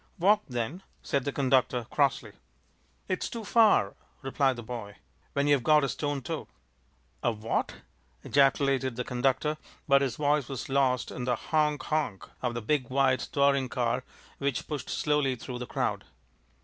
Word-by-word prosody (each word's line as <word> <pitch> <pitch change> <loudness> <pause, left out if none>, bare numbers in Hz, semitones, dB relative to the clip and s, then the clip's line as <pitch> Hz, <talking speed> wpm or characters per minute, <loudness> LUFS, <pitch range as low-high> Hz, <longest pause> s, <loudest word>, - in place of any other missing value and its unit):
"Walk, 205 +4 +4
then!" 125 +9 -3 0.2
said 140 -4 -1
the 145 - 0
conductor, 130 -3 +1
crossly. 140 -6 +1 0.8
"It's 185 - -2
too 230 -1 -6
far," 220 0 +4 0.3
replied 135 0 +1
the 120 - -7
boy, 110 -3 -7 0.4
"when 140 0 +1
you've 145 -2 +4
got 150 +4 +4
a 140 - 0
stone 145 +1 -2
toe." - - -4 0.7
"A 120 - +2
what?" 110 0 -2 0.5
ejaculated 135 -2 +2
the 125 - -2
conductor; 135 +5 0 0.3
but 140 -1 +5
his 130 -5 -1
voice 145 -2 +1
was 135 -1 -5
lost 130 -2 +1
in 125 - -5
the 125 -1 +1
honk! 150 +2 0
honk! 150 -11 -2
of 120 -2 -2
a - - -3
big 130 +1 0
white 130 -1 +3
touring 140 -2 +2
car 125 +1 -1 0.4
which 140 -4 -2
pushed 145 -5 -5
slowly 150 -3 +1
through 125 +1 -7
the 125 - -5
crowd. - - -1
135 Hz, 160 wpm, -28 LUFS, 125-145 Hz, 0.8 s, but